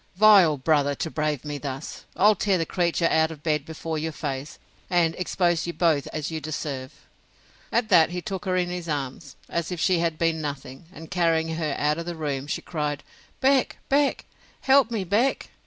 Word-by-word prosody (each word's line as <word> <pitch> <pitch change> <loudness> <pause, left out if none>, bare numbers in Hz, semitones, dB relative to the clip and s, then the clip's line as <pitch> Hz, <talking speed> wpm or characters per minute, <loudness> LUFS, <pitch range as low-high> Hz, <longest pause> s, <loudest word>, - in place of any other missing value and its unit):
Vile 195 -6 +6
brother, 145 0 +2
to 160 - -4
brave 150 -3 -2
me 145 -1 -4
thus! 135 +1 -6
I'll 210 +3 +5
tear 200 -2 +1
the 165 - -1
creature 170 0 0
out 160 -1 +3
of 155 -3 -10
bed 150 -3 0
before 160 0 -4
your 160 +1 -3
face, 145 -1 -5 0.3
and 175 -3 +2
expose 175 -1 0
you 170 - -3
both 160 -6 +1
as 155 0 -4
you 160 -1 -4
deserve. 140 -3 -6 0.7
At 235 -2 +1
that 165 -5 +6
he 180 +1 -4
took 195 +1 -5
her 185 -1 0
in 180 -1 0
his 175 -2 -5
arms, 140 0 -4
as 170 0 -3
if 180 - -4
she 180 0 +2
had 165 -2 0
been 165 -1 0
nothing; 140 -1 -6
and 160 -3 -12
carrying 165 -2 +1
her 160 -3 -2
out 150 +2 +1
of 170 - -6
the 175 - -4
room, 145 -3 -3
she - - -3
cried 150 -4 -3
out, - - -28
Beck! 265 0 +3
Beck! 280 +1 +2 0.4
help 270 -2 +4
me, 225 -4 -2
Beck! 215 +9 0
160 Hz, 200 wpm, -25 LUFS, 150-180 Hz, 0.7 s, Vile